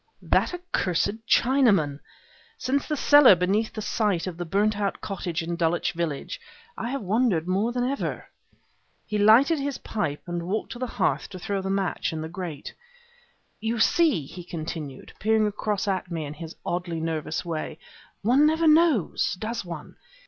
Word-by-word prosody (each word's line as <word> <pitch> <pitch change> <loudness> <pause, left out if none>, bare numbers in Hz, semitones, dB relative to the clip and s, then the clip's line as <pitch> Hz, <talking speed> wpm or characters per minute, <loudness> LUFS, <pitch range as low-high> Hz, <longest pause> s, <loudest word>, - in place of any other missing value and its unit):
"That - - +2
accursed 225 - -1
Chinaman! 210 - +3 0.6
Since 280 -9 -1
the 300 - -1
cellar 290 -7 +7
place - - -10
beneath 210 +4 0
the 215 - -5
site 205 -7 0
of 185 -3 -4
the 175 +1 -5
burnt 205 +5 +1
out 200 -1 -1
cottage 175 -4 -3
in 170 +1 -3
Dulwich 170 0 +1
Village 170 - -4 0.3
I 235 - -4
have 275 -2 -3
wondered 200 -4 +1
more 200 +6 +1
than 245 0 -1
ever." 275 +3 -2 0.8
He 210 - -2
lighted 245 +10 +6
his 280 -1 -2
pipe 150 -10 -3
and 175 -1 -4
walked 215 +4 -2
to 240 - -7
the 255 - -2
hearth - - -1
to 190 - -8
throw 200 +1 -2
the 190 - -4
match 195 -1 -1
in 160 - -3
the 160 - -5
grate. 170 -4 -6 0.9
"You 225 +2 -1
see," 290 - +3
he 175 +6 -9
continued, 155 -5 -6
peering 220 +1 +3
across 210 -1 -2
at 185 -2 -1
me 165 -3 -3
in 145 - -6
his 160 +2 -9
oddly 175 -1 -2
nervous 160 +1 -3
way, 160 -2 -4 0.5
"one 260 +8 +5
never 320 +1 +2
knows, 310 - +3
does 220 +4 -4
one? 170 -4 -8
200 Hz, 170 wpm, -26 LUFS, 170-235 Hz, 0.9 s, cellar